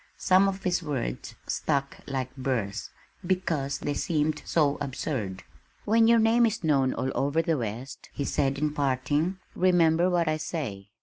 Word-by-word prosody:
Some 190 +1 +4
of 195 0 -3
his 180 0 +1
words 135 - -4
stuck 140 -2 -1
like 130 -2 -3
burrs, 115 -7 -2 0.3
because 170 -7 -1
they 145 - -2
seemed 155 -1 0
so 145 -3 +2
absurd. 120 -8 -3 0.4
"When 225 +1 +4
your 235 0 +6
name 230 +1 +4
is 220 -4 -3
known 135 -4 +3
all 130 +1 -1
over 145 +4 +1
the 165 -4 0
West," 120 +4 -6
he 140 - -3
said 140 -1 0
in 150 +1 0
parting, 145 +6 0 0.2
"remember 175 -1 +3
what 175 -2 +1
I 155 0 +1
say. 110 - -5
150 Hz, 160 wpm, -27 LUFS, 135-175 Hz, 0.4 s, your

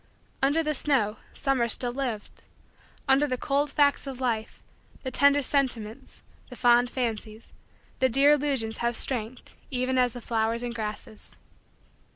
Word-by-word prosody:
Under 285 +4 +2
the 305 0 0
snow, 255 -8 +1
summer 270 -4 0
still 240 +2 -2
lived. 240 -5 -5 0.6
Under 270 +2 +4
the 255 -2 -2
cold 285 +3 0
facts 285 0 +2
of 265 -2 -6
Life, 230 -4 -3 0.4
the 260 - -3
tender 280 +1 +4
sentiments, 245 -6 -2 0.3
the 250 - -9
fond 245 0 +4
fancies, 225 -3 -4 0.5
the 260 - +3
dear 275 +4 +5
illusions 270 -7 0
have 235 -1 0
strength 240 -1 -2 0.2
even 255 0 0
as 250 -2 +2
the 245 - -7
flowers 230 +1 -1
and 240 -1 -3
grasses. 215 -1 -7
250 Hz, 145 wpm, -27 LUFS, 230-275 Hz, 0.6 s, dear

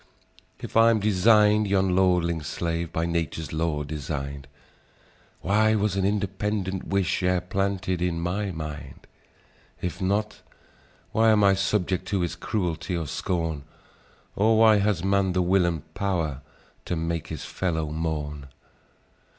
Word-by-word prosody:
"If - - -9
I'm 115 0 +5
design'd 105 +1 +4
yon 95 -2 +2
lordling's 85 -4 +2
slave, 85 -1 -3
By 80 - -1
Nature's 80 -3 -3
law 80 -2 -1
design'd, 70 -1 -5 0.9
Why 110 +3 +3
was 105 -2 0
an 95 -1 +1
independent 100 -1 -2
wish 100 -2 0
E'er 90 0 +2
planted 95 0 -2
in 90 -2 0
my 95 +4 -2
mind? 75 -5 -7 0.7
If 90 +1 -4
not, 100 +3 -1 0.7
why 110 0 +4
am 105 -1 +4
I 100 -1 +6
subject 95 -1 0
to 100 -2 0
His 85 -1 -2
cruelty, 90 -2 -2
or 80 - -3
scorn? 80 0 -2 0.7
Or 110 +2 +3
why 110 -1 +6
has 100 -4 +1
man 95 -1 +2
the 90 - +2
will 90 0 +3
and 80 -4 -2
pow'r 85 -9 -2 0.4
To 90 - -2
make 80 0 -2
his - - -6
fellow 80 -5 -2
mourn? 75 -3 -3
90 Hz, 135 wpm, -25 LUFS, 80-100 Hz, 0.9 s, I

